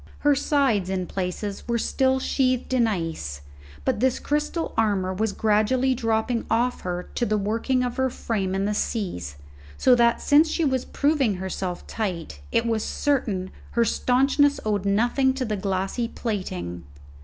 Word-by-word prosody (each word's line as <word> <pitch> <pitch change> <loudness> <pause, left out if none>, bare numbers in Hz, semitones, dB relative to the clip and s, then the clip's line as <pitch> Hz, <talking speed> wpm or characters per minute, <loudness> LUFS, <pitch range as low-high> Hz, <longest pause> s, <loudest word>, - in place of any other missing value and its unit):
Her 290 0 +5
sides 270 -9 +1
in 185 -1 -1
places 190 +3 -4
were 235 0 +1
still 260 +3 +1
sheathed 255 -1 0
in 240 -3 +4
ice, 165 - -3 0.4
but - - +1
this 260 +1 +2
crystal 300 +3 -1
armour 200 -4 +1
was 215 +3 0
gradually 220 +6 +2
dropping 225 -1 -1
off 240 +2 +1
her 180 0 -4
to - - -1
the 215 -2 +1
working 230 +5 0
of 245 0 -3
her 260 0 +2
frame 200 -6 -2
in 195 +1 0
the 210 - 0
seas, 180 - -3 0.4
so 255 - +5
that, 235 -1 +4
since 305 +3 +4
she 330 0 0
was 260 -3 0
proving 280 -8 +1
herself 185 -1 -4
tight, 175 - -4
it 230 - +2
was 225 -2 0
certain 210 -10 -1 0.2
her 235 -1 +3
staunchness 275 +5 +2
owed 205 -2 0
nothing 240 +6 +2
to 265 -1 -2
the 215 -2 -1
glassy 195 +4 -1
plating. 90 - -4
225 Hz, 160 wpm, -24 LUFS, 190-260 Hz, 0.4 s, Her